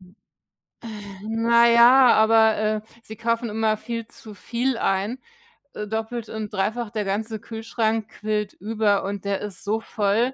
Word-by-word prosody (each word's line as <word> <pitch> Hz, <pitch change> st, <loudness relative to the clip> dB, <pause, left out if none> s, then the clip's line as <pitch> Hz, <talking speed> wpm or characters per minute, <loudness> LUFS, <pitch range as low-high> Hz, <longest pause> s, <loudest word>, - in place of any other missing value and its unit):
Äh, 185 Hz, +2 st, -20 dB, 1.1 s
na 235 Hz, +1 st, +4 dB
ja, 240 Hz, +2 st, +7 dB
aber, 220 Hz, 0 st, +4 dB
äh, 215 Hz, 0 st, 0 dB, 0.2 s
sie 220 Hz, -, -9 dB
kaufen 230 Hz, 0 st, -1 dB
immer 215 Hz, 0 st, 0 dB
viel 230 Hz, 0 st, -5 dB
zu 215 Hz, -2 st, -12 dB
viel 240 Hz, +4 st, -2 dB
ein, 200 Hz, +6 st, -1 dB, 0.5 s
äh, 210 Hz, -, -5 dB
doppelt 220 Hz, +1 st, -4 dB
und 215 Hz, -1 st, -6 dB
dreifach. 220 Hz, +4 st, -1 dB
Der 210 Hz, -1 st, -3 dB
ganze 220 Hz, +3 st, -2 dB
Kühlschrank 225 Hz, 0 st, -2 dB
quillt 210 Hz, -1 st, -3 dB
über 210 Hz, 0 st, 0 dB
und 200 Hz, 0 st, -5 dB
der 200 Hz, 0 st, -1 dB
ist 210 Hz, +2 st, -7 dB
so 215 Hz, +2 st, 0 dB
voll 220 Hz, +5 st, 0 dB
220 Hz, 150 wpm, -23 LUFS, 210-230 Hz, 1.1 s, ja